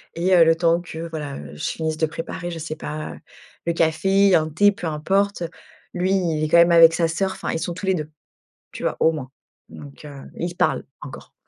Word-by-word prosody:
Et, 180 +3 +1
heu, 170 - +7
le 165 0 +4
temps 170 +1 +2
que, 165 -1 -7
voilà, 150 -3 -6
heu, 70 0 -10
je 75 - -8
finisse 160 -1 -2
de 160 - +2
préparer, 165 +2 -6
je 170 - -6
sais 155 0 -5
pas, 155 0 -6 0.5
le 170 - +2
café, 190 +5 +2
un 155 0 +2
thé, 205 +7 +4
peu 185 -4 -6
importe. 195 +5 0 0.5
Lui, 180 +1 0
il 165 -5 0
est - - +1
quand 170 - +5
même 170 0 +6
avec 165 -1 +7
sa 165 0 +1
sœur 190 +4 -1
enfin, - - -4
ils 165 - -2
sont 175 - -3
tous 185 - -6
les 190 - +2
2, 155 -3 -4 0.6
tu - - -8
vois, - - -1
au 160 - +4
moins, 150 -5 -6 0.4
donc, 145 +1 -12
heu, 140 -2 -10
ils 175 - -3
se 175 - -11
parlent - - 0 0.2
encore. - - -11
165 Hz, 230 wpm, -22 LUFS, 155-180 Hz, 0.6 s, heu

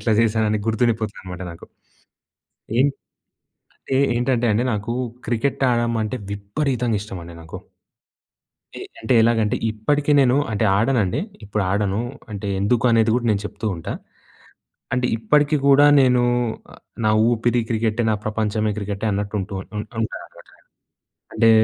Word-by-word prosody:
ఇట్లా 110 - +1
చేశానని 110 -1 +1
గుర్తుండిపోతది 110 -1 0
అనమాట 90 -1 -8
నాకు. 85 - -11 1.1
ఏంటే 135 +1 +3 0.9
అంటే 135 - -2 0.2
ఏంటంటే 120 0 +1
అండి 115 +4 +1
నాకు 105 +2 -3 0.3
క్రికెట్ 125 +4 -1
ఆడడమంటే 120 -1 0 0.2
విపరీతంగా 115 +3 -1
ఇష్టం 100 -3 -7
అండి 85 0 -10
నాకు. 80 - -9 1.2
ఎ - - -9 0.2
అంటే 110 +3 +1
ఎలాగంటే 110 -2 +2
ఇప్పటికి 145 +7 0
నేను 130 0 +4 0.2
అంటే 105 +1 0
ఆడనండి 110 -4 +1 0.2
ఇప్పుడు 105 0 -2
ఆడను. 100 +1 0 0.3
అంటే 100 0 -5
ఎందుకు 120 +4 +1
అనేది 115 -1 +3
కూడా 120 -1 0
నేను 100 -1 +1
చెప్తూ 105 +1 -6
ఉంటా. 80 - -5 1.0
అంటే 125 0 +1
ఇప్పటికి 150 +6 +2
కూడా 145 +1 +7
నేను 125 -2 +4 0.8
నా 110 - +4 0.2
ఊపిరి 120 +1 +1
క్రికెటే, 115 0 0
నా - - +2
ప్రపంచమే 110 0 -1
క్రికెటే 100 +1 -3
అన్నట్టు 100 +1 -3
ఉంటూ 100 +1 -6
ఉంటాననమాట 110 +2 -6
నేను. - - -23 0.7
అంటే 115 +1 +4
110 Hz, 130 wpm, -21 LUFS, 105-120 Hz, 1.2 s, కూడా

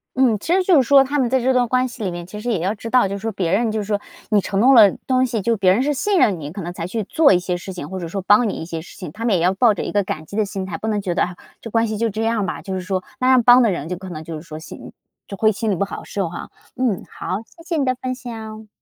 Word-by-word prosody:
嗯， 250 -5 +3
其 325 - -1
实 375 0 +3
就 360 -6 +5
是 245 - -4
说 280 -1 +7
他 285 +2 -1
们 250 -3 +1
在 260 +1 +2
这 260 +2 +2
段 250 -1 +2
关 255 +2 +1
系 240 -2 -8
里 190 - -1
面 175 0 -6
其 210 +4 -9
实 245 - -3
也 205 - 0
要 185 +5 0
知 225 +1 -8
道， 250 -3 +4
就 195 - -4
是 - - -6
说 225 +1 -2
别 185 -5 -2
人 225 +2 +2
就 220 - -2
是 - - -2
说 205 0 -1 0.3
你 210 -2 +3
承 195 +1 -2
诺 255 +5 +6
了 215 -6 +8 0.2
东 255 0 +3
西， 230 -4 -2
就 230 +4 +1
别 190 -3 +3
人 220 +7 +2
是 295 +2 +1
信 390 +7 +1
任 195 - +3
你， 145 -1 -7
可 195 +4 -6
能 175 0 -5
才 170 0 -5
去 220 +3 -3
做 305 +9 +4
一 180 - +4
些 180 0 -2
事 190 +2 -8
情， 155 -5 -7
或 190 - -5
者 170 - -5
说 195 +4 -4
帮 210 +4 +4
你 - - -3
一 - - -6
些 165 -1 -5
事 170 - -14
情。 180 -6 -7
他 225 - -8
们 230 -4 +2
也 170 - +1
要 180 +2 +3
抱 220 +3 +4
着 - - -4
一 - - -4
个 205 -1 +1
感 155 -4 -5
激 200 - -10
的 215 - +2
心 195 -1 -5
态， 190 - -5
不 220 - -5
能 210 -2 0
觉 185 -3 -2
得， - - +2
唉， 180 - -4 0.3
这 230 - -7
关 225 +1 +2
系 215 - -3
就 230 +1 0
这 220 +2 -3
样 225 -2 0
吧， - - -4
就 190 - -6
是 185 - -2
说 185 0 -2 0.2
那 255 - +2
样 255 -2 +5
帮 245 +2 +7
的 235 - +4
人 160 -4 -4
就 180 - -3
可 190 +1 -9
能 160 -3 -7
就 165 0 -7
是 155 - -7
说 160 -2 -9
心 160 - -10
里 - - -13 0.3
就 200 - -7
会 220 +1 +3
心 220 +2 -3
里 200 - +1
不 200 - 0
好 - - -7
受 195 -3 -3
哈， 175 - -8 0.3
嗯， 245 -7 -1
好， 185 - -4 0.2
谢 330 - -14
谢 335 -1 -2
你 280 - +1
的 255 -1 +1
分 255 0 -2
享。 220 -4 -8
210 Hz, 375 characters per minute, -20 LUFS, 185-245 Hz, 0.3 s, 了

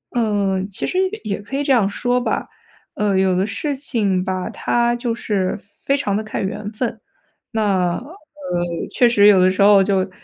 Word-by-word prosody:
嗯， 200 -4 0
其 200 - -3
实 365 - -2 0.3
也 205 -3 -3
可 205 +6 -7
以 285 - 0
这 280 - 0
样 230 -7 +4
说 245 +5 0
吧。 245 - -2 0.5
呃， 205 -2 0
有 190 -1 +2
的 185 +2 +1
事 275 +7 -3
情 210 -9 0
吧， 185 -1 -2
它 240 0 0
就 240 -1 -2
是 205 -4 -2 0.3
非 275 - +3
常 205 -9 -1
地 215 - -2
看 215 - -4
缘 205 +2 -4
分。 230 0 -3 0.5
那， 225 - -1 0.3
呃， 250 - -7 0.8
确 245 - +4
实 210 -4 +5
有 200 -2 +7
的 185 0 +4
时 190 - -1
候 200 -1 +7
就 190 -1 0
210 Hz, 200 characters per minute, -20 LUFS, 195-240 Hz, 0.8 s, 有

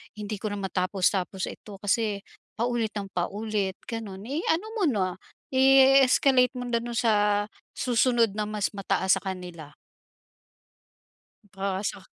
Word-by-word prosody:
Hindi 210 0 -5
ko 205 +1 -4
na - - -4
matapos-tapos 190 0 0
ito 205 - -10
kasi, 205 -1 0 0.3
paulit 235 -1 -1
ng 200 -2 -5
paulit," 200 +2 -2
gano'n. 215 -5 -6
Eh, 295 +5 -2
ano 340 +6 -2
mo - - +1
na, 190 -8 0 0.3
i-escalate 265 -1 +5
mo 245 -1 -5
na 235 - +2
dun 240 +1 -6
sa 210 -3 +2 0.3
susunod 240 -2 +2
na 210 - 0
mas 210 -1 -1
mataas 195 -1 +1
sa - - -7
kanila. 175 -5 -7 1.8
Oo, 195 0 -2
sa 200 - -3
210 Hz, 135 wpm, -26 LUFS, 195-240 Hz, 1.8 s, i-escalate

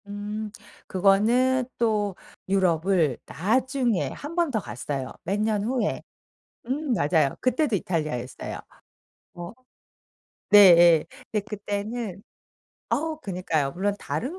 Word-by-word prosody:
음. 210 +1 -5 0.7
그거는 255 +3 +2
또 210 -4 0 0.3
유럽을 175 -6 +2
나중에 240 - 0
1 295 +4 -8
번 340 -2 +2
더 220 - 0
갔어요 130 - -5
몇 195 +4 -1
년 215 -1 0
후에. 235 -1 -1 0.7
음 275 +1 -1
맞아요. 150 -6 +2
그때도 255 -1 +1
이탈리아였어요. 155 -9 -3 0.8
어. 175 -1 -7 1.0
네예. 175 -5 +8 0.3
근데 210 -2 -1
그때는 205 0 -4 0.7
어 320 +1 -1
그니까요. 175 - -1
물론 200 +3 -1
다른 280 - -4
205 Hz, 215 characters per minute, -25 LUFS, 175-240 Hz, 1.0 s, 네예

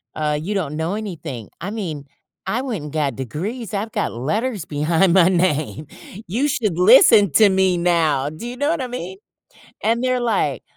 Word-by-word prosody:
uh, 150 -1 -1
you 200 +6 -3
don't 160 -7 -3
know 160 +3 -2
anything. 165 - -6
I 195 +5 -4
mean, 160 -10 -5 0.4
"I 225 +6 -1
went 230 - -4
and 150 - -9
got 145 -5 -1
degrees, 190 - -5
I've 210 +3 -3
got - - -2
letters 200 - -2
behind 165 +5 +1
my 180 -1 +5
name. 155 -5 0 0.4
You 240 +11 0
should 215 - -1
listen 200 +2 +6
to 215 -2 +6
me 190 -1 +2
now." 165 -5 +1
Do 155 +10 -8
you 245 - -6
know 285 +3 0
what 330 -3 0
I 255 - -3
mean? 190 -7 -6 0.7
And 230 +3 +1
they're 255 -1 +1
like, 205 - 0
185 Hz, 185 wpm, -20 LUFS, 155-220 Hz, 0.7 s, listen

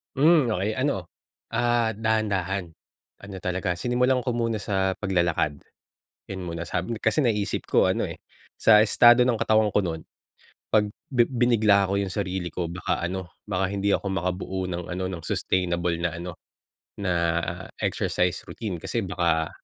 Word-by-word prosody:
Hmm 155 +1 +5
okey 105 +4 -1
ano, 115 - -1 0.4
ah, 120 -1 +1
dahan-dahan. 100 -5 -1 0.6
Ano 100 -1 -8
talaga 90 0 -1
sinimulan 125 +6 +1
ko 125 - -3
muna 115 -3 -1
sa 95 -2 0
paglalakad, 85 -6 +1 0.7
yun 95 -1 -5
muna. 85 0 -4
Sabi 90 +6 -2
kasi 155 - +2
naisip 105 -4 0
ko - - +4
ano - - 0
eh, - - -9 0.4
sa 105 -2 +6
estado 120 +3 +6
ng 125 - +3
katawan 110 -1 +3
ko - - +3
nun, 80 -4 -3 0.7
pag 105 -1 +4 0.2
bi 120 -2 +5
binigla 115 -5 +3
ko - - +1
yung 100 - -1
sarili 95 -3 -2
ko 85 +1 -4
baka 90 - -2
ano, 90 -1 -4
baka 95 -2 -1
hindi 100 0 0
ako 100 - 0
makabuo 95 +1 -2
ng 90 -1 -4
ano, 95 +1 -3
ng 85 - -5
sustainable 85 0 0
na 85 0 0
ano, 85 0 -7 0.6
na 100 -3 -1 0.7
exercise 90 -2 0
routine 100 -6 -5
kasi 115 - -2
baka 85 -4 0
95 Hz, 155 wpm, -25 LUFS, 90-110 Hz, 0.7 s, sa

